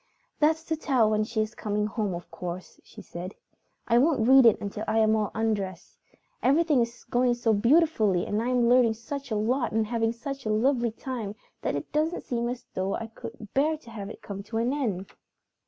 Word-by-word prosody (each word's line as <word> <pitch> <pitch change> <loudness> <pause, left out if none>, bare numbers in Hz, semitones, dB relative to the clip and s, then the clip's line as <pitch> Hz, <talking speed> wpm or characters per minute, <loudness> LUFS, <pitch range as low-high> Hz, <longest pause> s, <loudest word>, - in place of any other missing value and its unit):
"That's 315 +1 +3
to 325 -1 -1
tell 255 -8 +2
when 215 0 +2
she 220 0 -1
is 215 +1 -3
coming 210 -1 -1
home, 210 -3 -2
of 175 - -9
course," 180 0 -7
she - - -13
said. 180 +3 -7 0.5
"I 235 - +4
won't 270 -5 +3
read 265 -2 +8
it 225 - +4
until 205 +1 -5
I 220 - +1
am 220 0 +4
all 215 -2 0
undressed. 205 -5 -2 0.4
Everything 295 -1 +3
is 235 0 -4
going 245 0 +1
so 230 -2 +1
beautifully 225 - +3
and 210 +1 -1
I 235 - -2
am 245 -2 +3
learning 240 -2 +4
such 275 +4 -6
a 220 - -1
lot 240 +5 0
and 220 0 +2
having 225 0 0
such 270 +3 -6
a 215 - -3
lovely 240 +2 +2
time 225 -3 -5 0.3
that - - -1
it 145 - -5
doesn't 310 +3 0
seem 235 -1 -2
as 245 0 -6
though 190 +1 -1
I 225 - -4
could 225 -2 -9
bear 310 +3 +2
to 235 -6 -15
have 205 -3 -6
it - - -11
come 200 -1 -6
to 225 +1 -4
an 235 +4 +1
end." 210 -10 -2
230 Hz, 210 wpm, -27 LUFS, 215-255 Hz, 0.5 s, read